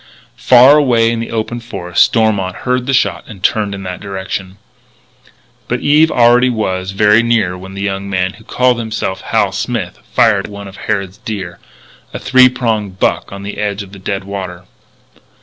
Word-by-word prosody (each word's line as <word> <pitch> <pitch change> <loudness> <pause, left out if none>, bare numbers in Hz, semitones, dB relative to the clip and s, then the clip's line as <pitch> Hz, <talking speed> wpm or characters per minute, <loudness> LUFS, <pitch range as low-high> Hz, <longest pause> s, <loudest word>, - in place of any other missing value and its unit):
Far 130 +4 +7
away 120 -6 +3
in 115 - -2
the 115 - -4
open 115 +1 -3
forest 90 -7 0
Stormont 100 -5 0
heard 125 0 0
the - - +1
shot 130 - +1
and 100 -5 -12
turned 105 -1 +1
in 95 - -8
that 90 -1 -6
direction. 95 -1 -6 1.1
But - - -2
Eve 155 +2 +4
already 120 0 +4
was 95 -5 -2
very 105 +3 +4
near 115 -6 +1
when 95 +1 -10
the 100 - -4
young 100 0 -3
man 95 -1 -1
who 110 - -16
called 125 +1 +1
himself 110 -4 -3
Hal 105 -4 0
Smith 105 -2 -4
fired 105 -4 +3
at - - -10
one 100 0 -8
of 95 - -12
Harrod's 100 -1 -3
deer 95 -6 -6 0.6
a - - -1
three 130 0 +5
prong 115 -5 -1
buck 95 0 -1
on 100 0 -8
the 100 - -6
edge 100 -1 -2
of 95 - -14
the 100 - -11
dead 95 +1 -3
water. 95 -2 -6
105 Hz, 185 wpm, -15 LUFS, 95-115 Hz, 1.1 s, Far